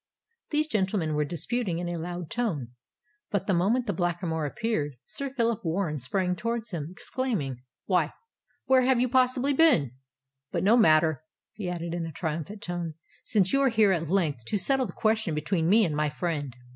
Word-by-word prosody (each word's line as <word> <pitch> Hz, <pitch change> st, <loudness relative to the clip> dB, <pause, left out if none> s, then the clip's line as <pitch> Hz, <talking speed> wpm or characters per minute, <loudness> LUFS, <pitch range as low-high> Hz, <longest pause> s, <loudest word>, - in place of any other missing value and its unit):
These 305 Hz, 0 st, +2 dB
gentlemen 190 Hz, -, 0 dB
were 150 Hz, 0 st, +1 dB
disputing 175 Hz, -, -2 dB
in 175 Hz, 0 st, -3 dB
a 175 Hz, -1 st, -3 dB
loud 175 Hz, -1 st, -5 dB
tone; 175 Hz, -, -1 dB, 0.6 s
but 200 Hz, -2 st, -1 dB
the 200 Hz, -, +1 dB
moment 210 Hz, +9 st, +2 dB
the 205 Hz, -, -1 dB
Blackamoor 170 Hz, -3 st, -1 dB
appeared, 150 Hz, -, -2 dB
Sir 280 Hz, 0 st, -4 dB
Phillip 235 Hz, -4 st, 0 dB
Warren 165 Hz, -3 st, -1 dB
sprang 180 Hz, +8 st, -1 dB
towards 230 Hz, +3 st, -3 dB
him, 155 Hz, -5 st, -3 dB
exclaiming, 180 Hz, -, -3 dB, 0.2 s
"Why, 175 Hz, -5 st, +2 dB, 0.5 s
where 260 Hz, -1 st, +5 dB
have 255 Hz, -1 st, +3 dB
you 250 Hz, -, +3 dB
possibly 255 Hz, +2 st, +2 dB
been? 265 Hz, -, +4 dB, 0.6 s
But -, -, -1 dB
no 210 Hz, +4 st, +6 dB
matter," 160 Hz, -, +4 dB, 0.3 s
he 195 Hz, -5 st, -4 dB
added, 170 Hz, -1 st, -4 dB
in 170 Hz, -1 st, -2 dB
a -, -, -6 dB
triumphant 165 Hz, +6 st, -4 dB
tone, 175 Hz, -3 st, -4 dB, 0.3 s
"since 195 Hz, -4 st, +2 dB
you 275 Hz, -, +4 dB
are 270 Hz, -, +4 dB
here 220 Hz, -4 st, +4 dB
at 165 Hz, -4 st, -1 dB
length 160 Hz, -, +1 dB
to 205 Hz, -, 0 dB
settle 260 Hz, +6 st, +1 dB
the -, -, -9 dB
question 215 Hz, -7 st, +1 dB
between 160 Hz, +2 st, 0 dB
me 215 Hz, +2 st, +6 dB
and 155 Hz, -4 st, -1 dB
my 150 Hz, 0 st, +1 dB
friend." 145 Hz, -4 st, -3 dB
180 Hz, 185 wpm, -27 LUFS, 160-230 Hz, 0.6 s, no